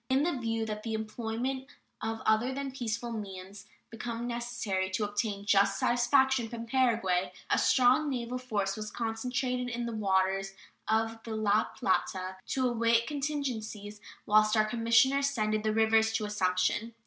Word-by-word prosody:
In 265 +2 +3
the 345 -2 0
view 225 -2 -2
that 215 -1 -4
the 220 0 -3
employment 230 +4 -3 0.3
of 225 0 -3
other 220 +4 +3
than 275 0 -4
peaceful 235 -2 -3
means 195 -2 -7
might - - -31
become 230 +1 -5
necessary 235 -6 -2
to 190 +3 -1
obtain 205 -1 -2
"just 200 -1 +3
satisfaction" 255 0 +3
from 230 0 -6
Paraguay, 225 -8 +1 0.2
a - - +4
strong 260 +4 +4
naval 250 -1 -3
force 205 -6 -2
was 215 0 -5
concentrated 250 +3 -2
in 240 0 -3
the 235 - -4
waters 195 -1 +1 0.3
of 225 +1 0
the 225 -1 -5
La 215 -1 +2
Plata 185 0 -1
to 260 -1 +1
await 230 -1 +2
contingencies 240 -8 -4 0.2
whilst 215 +1 +4
our 215 - +4
commissioner 230 +4 +3
ascended 215 -7 0
the 215 0 0
rivers 220 0 +3
to 220 -1 0
Assumption. 205 +3 0
225 Hz, 155 wpm, -30 LUFS, 210-245 Hz, 0.3 s, a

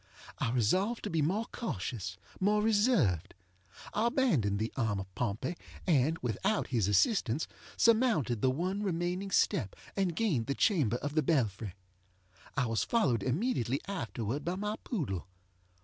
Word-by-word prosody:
I - - +1
resolved 185 - +1
to - - -3
be 165 -1 +1
more 195 +10 +1
cautious, 100 - -4 0.2
more 210 +2 +3
reserved. 205 - +2 0.6
I 225 +2 +2
abandoned 170 - +2
the 110 +2 -2
arm 110 -6 0
of 95 -1 -8
Pompey, 120 - -2 0.3
and, 155 -1 +3
without 125 - 0
his 115 -7 +1
assistance, 120 - +2 0.3
surmounted 220 - +3
the 130 - +4
one 180 +9 -1
remaining 180 0 -1
step, 170 - +1 0.2
and 190 -4 0
gained 160 - +1
the 140 - 0
chamber 145 - +2
of 145 +3 -4
the 155 - +3
belfry. 110 - 0 0.8
I 135 - +3
was 115 -1 0
followed 135 - +2
immediately 135 - 0
afterward 120 - -3
by 175 +2 -1
my 210 +3 -2
poodle. 100 - -3
145 Hz, 145 wpm, -32 LUFS, -, 0.8 s, the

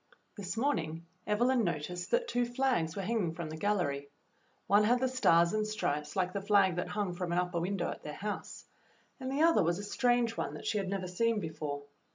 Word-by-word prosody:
This 200 +1 -5
morning 165 - -1 0.2
Evelyn 240 +4 +3
noticed 175 +1 -3
that 485 0 +1
two 245 - +1
flags 240 -9 0
were 195 - -3
hanging 190 -6 0
from 165 -2 -5
the - - -5
gallery. 155 -7 -1 0.6
One 205 +1 +5
had 245 +4 +3
the 260 - +2
stars 170 -10 +4
and 215 0 0
stripes 150 -8 -2
like 185 -1 0
the 200 - -2
flag 195 -3 +3
that 175 - -1
hung 205 -4 -2
from 175 0 -3
an 175 - +1
upper 180 -1 0
win 190 +4 -1
dow 175 - -1
at - - -8
their 150 - -6
house, 210 +1 -5 0.5
and 260 0 -4
the 285 +3 +2
other 330 0 +5
was 170 0 +1
a 205 - -5
strange 240 +2 +1
one - - -3
that - - -9
she 210 - +1
had 195 -2 -3
never 190 -2 -2
seen 225 +5 +1
before. 150 -4 -4
195 Hz, 215 wpm, -32 LUFS, 170-230 Hz, 0.6 s, One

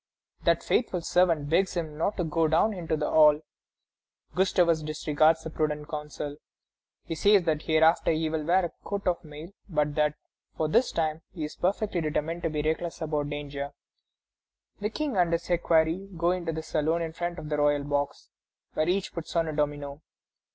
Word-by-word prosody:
That - - +3
faithful 185 -7 0
servant 165 -4 +2
begs 185 +5 +2
him 160 -3 -3
not 170 +7 -1
to 180 - 0
go 160 0 +1
down 165 +8 +3
into 165 -4 -2
the 150 - -1
hall. 150 -1 +6 0.9
Gustavus 180 -3 +3
disregards 155 +1 +2
the 160 - -6
prudent 150 -1 -2
counsel. 150 -1 -5 0.7
He - - -4
says 200 +3 +4
that 155 -2 0
hereafter 160 +1 +3
he 160 0 +1
will 155 -1 -2
wear 175 +3 +3
a 170 - -5
coat 200 -1 -4
of 175 -1 0
mail, 155 +2 -10 0.2
but 150 -3 0
that, 150 0 +1 0.4
for 155 - +1
this 235 +11 +3
time, 160 -1 -1
he 160 - -4
is 150 - -5
perfectly 190 0 0
determined 160 +2 -2
to 165 - 0
be 150 -1 -2
reckless 160 +2 -2
about 150 -3 -2
danger. 145 -1 -5 1.1
The 210 0 -1
King 280 -1 -2
and 175 -2 +3
his 170 +1 -1
equerry 170 +2 +2
go 170 +1 +2
into 175 -2 -2
the 160 0 -4
saloon 160 +2 0
in 160 -1 -5
front 175 +1 -3
of 150 - -7
the 150 - 0
royal 145 -1 +2
box, 145 0 -2 0.4
where 155 +2 +1
each 190 +1 0
puts 170 -1 -6
on 165 -1 +2
a - - -3
domino. 145 -1 -2
160 Hz, 185 wpm, -28 LUFS, 150-175 Hz, 1.1 s, hall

